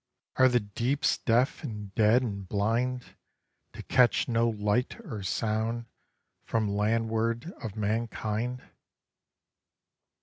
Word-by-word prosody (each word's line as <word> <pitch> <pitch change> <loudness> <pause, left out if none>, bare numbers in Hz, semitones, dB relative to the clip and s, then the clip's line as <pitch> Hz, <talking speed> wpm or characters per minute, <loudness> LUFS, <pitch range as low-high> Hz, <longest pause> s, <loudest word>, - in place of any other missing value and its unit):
Are 130 0 +6
the 125 -1 +3
deeps 120 +8 0
deaf 120 +3 +2
and 105 -3 -6
dead 115 +3 +4
and 100 -5 -5
blind, 120 +5 -1 0.6
To - - -8
catch 125 -2 +3
no 115 0 +2
light 110 - 0
or 110 - -5
sound 110 +4 -1 0.6
from 110 -3 -1
landward 115 - 0
of 110 -4 -5
mankind? 110 +2 -2
115 Hz, 105 wpm, -29 LUFS, 105-125 Hz, 0.6 s, Are